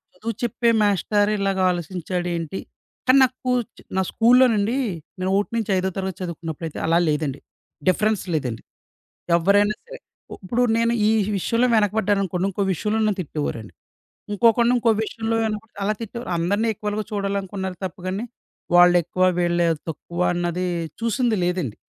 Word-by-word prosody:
చదువు 225 +5 -4
చెప్పే 240 0 +1
మాస్టరు 205 +1 +2
ఇలాగ 195 -1 0
ఆలోచించాడేంటి. 175 0 -3 0.5
కానీ 260 +2 +6
నాకు 255 0 +1
స్కూ 255 - -2 0.5
నా - - +3
స్కూలులోనండి 230 -2 +4 0.4
నేను 185 +1 -1
1 205 - -1
నుంచి 215 -3 -1
ఐదో 185 +1 0
తరగతి 190 -1 -3
చదువుకున్నప్పుడైతే 165 -2 -5
అలా 165 +1 +3
లేదండి. 150 -2 -1 0.5
డిఫరెన్స్ 215 +2 +1
లేదండి. 125 -6 -2 0.8
ఎవ్వరైనా 205 +4 +3
సరే. - - -10 0.4
ఉప్పుడు 235 +6 -2 0.2
నేను 230 +1 +2
ఈ - - +4 0.3
విషయంలో 235 +6 +1
వెనకబడ్డాననుకోండి 200 -3 +1
ఇంకో 200 - -3
విషయంలో 215 +5 -1
నన్ను 210 -2 +1
తిట్టేవారండి. 145 - -5 0.6
ఇంకొకడిని 235 +3 +4
ఇంకో 235 -1 +3
విషయంలో 225 0 -2
వెనకపడితే 215 -1 -5
అలా 215 - +1
తిట్టేవారు. 235 0 -6
అందరిని 205 +7 +1
ఈక్వల్‌గా 210 +1 -3
చూడాలనుకున్నారు 195 -2 -3
తప్ప 185 +2 -6
గాని 195 +5 -2 0.5
వాళ్ళు 175 0 +7
ఎక్కువ, 185 +2 -1 0.2
వీళ్ళు 175 -1 +2 0.2
తక్కువ 170 +3 -5
అన్నది 175 +1 -1 0.4
చూసింది 230 -1 +1
లేదండి. 175 - -2
200 Hz, 135 wpm, -23 LUFS, 175-220 Hz, 0.8 s, వాళ్ళు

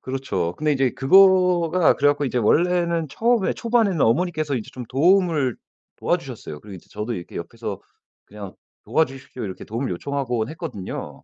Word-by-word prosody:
그렇죠. 100 -10 -3
근데 155 0 +1
인제 135 -2 +1
그거가 180 +2 +4
그래 145 - +3
갖고 145 0 +1
이제 125 -2 -1
원래는 170 +6 +2
처음에 230 - +1
초반에는 225 -8 +1
어머니께서 155 +2 +1
이제 110 - -6
좀 125 -2 -7
도움을 160 - +2 0.4
도와주셨어요. 75 - -3
그리고 105 -2 -11
이제 90 - -14
저도 105 +3 -4
이렇게 85 -4 -8
옆에서 - - -6 0.4
그냥 100 -2 -10 0.3
"도와주십시오." 135 -5 -2
이렇게 95 -3 -7
도움을 120 +5 -3
요청하곤 125 +1 -2
했거든요. 155 - -6
140 Hz, 415 characters per minute, -22 LUFS, 115-175 Hz, 0.4 s, 그거가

